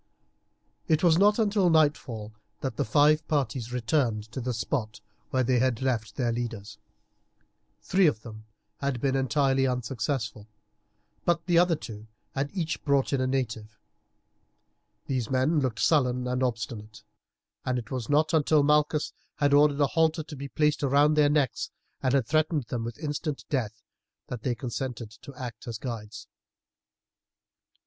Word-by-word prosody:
It 155 0 +2
was 170 -1 +5
not 205 +1 +5
until 205 -4 +3
nightfall 140 -9 +1 0.3
that 130 - -3
the 145 - 0
five 150 +6 +3
parties 125 -5 -1
returned 120 -3 0
to 130 - -4
the 125 +1 -2
spot 110 0 -3 0.3
where 130 -1 +1
they 125 0 +2
had 125 -2 +1
left 120 -4 -1
their 120 -4 0
leaders. 115 -3 -5 1.0
Three 185 -1 +4
of 110 -7 0
them 110 -2 -10 0.3
had 140 -3 -2
been 135 +2 0
entirely 135 0 +2
unsuccessful, 115 -3 -3 0.8
but 170 -1 +1
the 175 -2 +4
other 175 -1 +4
two 110 -7 -9 0.3
had 140 +1 -1
each 165 -3 -2
brought 140 -1 +2
in 135 - +1
a 130 - +1
native. 110 -5 -3 1.3
These 125 -5 -2
men 135 +5 +2
looked 130 -5 -1
sullen 125 -5 +2
and 125 +1 -1
obstinate, 110 -3 -4 0.6
and 125 -1 -1
it 120 - -6
was 125 -4 -4
not 150 +3 +2
until 155 -1 +4
Malchus 150 +1 +2 0.2
had 145 -2 +2
ordered 145 0 +5
a - - +6
halter 160 +2 +1
to 150 0 -9
be 140 0 -6
placed 150 +1 +1
round 145 +2 +4
their 150 -1 +5
necks 145 -4 0 0.3
and 130 -1 +2
threatened 155 +1 +1
them 120 -2 -2
with 115 0 -5
instant 150 -1 -4
death 110 -6 -2 0.5
that 125 -3 -5
they 125 0 -1
consented 120 -2 -5
to 125 - -12
act 125 -2 -8
as 115 -2 -4
guides. 110 -3 -7
130 Hz, 155 wpm, -27 LUFS, 115-150 Hz, 1.3 s, a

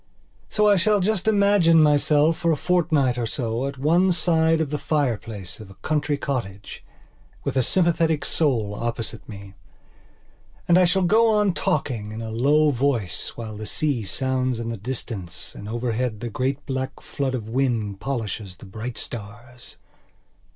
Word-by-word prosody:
So 210 - +2
I 205 -1 +5
shall 210 +3 +3
just 210 +1 0
imagine 200 -6 +5
myself 150 +1 +4
for 170 - +1
a - - +3
fortnight 155 -8 +1
or 115 - -1
so 120 +1 -2
at 140 -1 -6
one 170 +7 +3
side 160 -1 +2
of 155 -3 -1
the 150 - -2
fireplace 115 - -2
of 105 -3 -11
a 95 - -14
country 145 - -1
cottage, 100 -9 -5 0.6
with - - -2
a 130 - +4
sympathetic 165 0 +2
soul 120 -10 +1
opposite 115 +1 -4
me. 100 -2 -9 1.1
And 175 +1 +6
I 180 - +6
shall 185 +2 +2
go 225 +6 +4
on 210 -3 +3
talking, 120 -11 -1
in 110 - -6
a 110 -1 -5
low 145 +6 +3
voice 120 - -1
while 110 -2 -6
the 110 0 -6
sea 145 -6 -1
sounds 130 +2 -1
in 115 0 -4
the 115 - -3
distance 100 -6 -6
and 105 - -8
overhead 120 -1 -2
the 120 - -4
great 135 +4 -2
black 130 -1 -3
flood 135 -2 -3
of 110 -4 -5
wind 115 -5 -1
polishes 110 -7 -4
the - - -14
bright 110 +5 -6
stars. 120 +2 -8
130 Hz, 165 wpm, -24 LUFS, 110-160 Hz, 1.1 s, And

